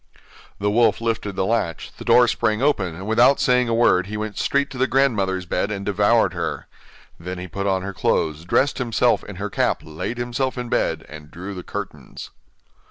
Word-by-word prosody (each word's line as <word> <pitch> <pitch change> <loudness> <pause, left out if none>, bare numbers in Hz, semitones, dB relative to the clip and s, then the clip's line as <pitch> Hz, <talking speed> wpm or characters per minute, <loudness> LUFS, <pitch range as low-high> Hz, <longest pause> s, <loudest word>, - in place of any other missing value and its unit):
The 105 +1 0
wolf 115 +2 +3
lifted 115 -3 -2
the 95 - 0
latch, 110 -7 -1
the - - -6
door 125 -1 +5
sprang 110 -1 0
open, 105 - +1
and 95 +3 -8
without 120 +6 +4
saying 125 -1 +3
a - - +1
word 95 -6 +3
he 105 +1 -5
went 105 -1 -4
straight 140 0 0
to 130 - -7
the 130 - +3
grandmother's 100 -10 +1
bed, 95 - -1
and 100 -2 -4
devoured 105 +3 +3
her. - - -3 0.5
Then 90 +2 -6
he 90 +1 -6
put 100 +3 -3
on 95 -1 0
her 100 0 -5
clothes, 80 -3 0
dressed 135 +11 +1
himself 115 -4 +1
in - - -9
her - - -5
cap - - 0
laid 80 +10 -5
himself 120 +2 -2
in 125 -1 -4
bed - - 0
and 75 -1 -11
drew 95 +5 -7
the 90 - -6
curtains. - - -8
105 Hz, 200 wpm, -22 LUFS, 95-120 Hz, 0.5 s, door